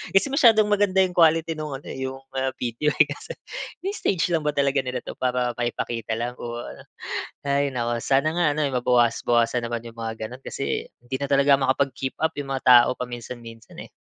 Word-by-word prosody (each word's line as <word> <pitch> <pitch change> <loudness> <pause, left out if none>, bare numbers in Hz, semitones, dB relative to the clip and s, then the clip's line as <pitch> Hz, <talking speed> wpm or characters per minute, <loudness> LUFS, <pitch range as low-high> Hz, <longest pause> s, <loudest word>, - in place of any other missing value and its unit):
kasi 195 - +5
masyadong 225 -7 +6
maganda 200 -2 +3
'yung 180 - -6
quality 165 0 +4
nung 155 -1 -5
ano 140 - -15
eh, - - -6
'yung 135 0 -5 0.2
ah, 130 0 0
video 120 +5 -1
eh. - - +7
Kasi - - -7 0.5
ini-stage 195 - 0
lang 160 - 0
ba 150 - +2
talaga 140 0 +2
nila 125 0 -3
'to - - -6
para 125 -1 0
maipakita 120 -2 -2
lang 120 +1 -3
o 120 0 -5
ano. - - -10 0.6
Hay 140 0 +1
naku, 120 -1 -1
sana 140 +3 +2
nga 175 -1 +2
ano 155 - 0
eh, 140 - -1
mabawas-bawasan 120 -1 +2
naman 120 0 -4
yung 115 - -10
mga 110 -1 -4
gano'n, 125 +3 -11
kasi 135 - -3 0.2
hindi 125 +2 -4
na 140 - -2
talaga 140 0 +5
makapag-keep 135 0 0
up 160 0 +1
'yung 140 -1 -4
mga 130 - -5
tao 120 -1 +8
paminsan-minsan 120 -2 -8
eh. - - -31
130 Hz, 195 wpm, -24 LUFS, 120-150 Hz, 0.6 s, tao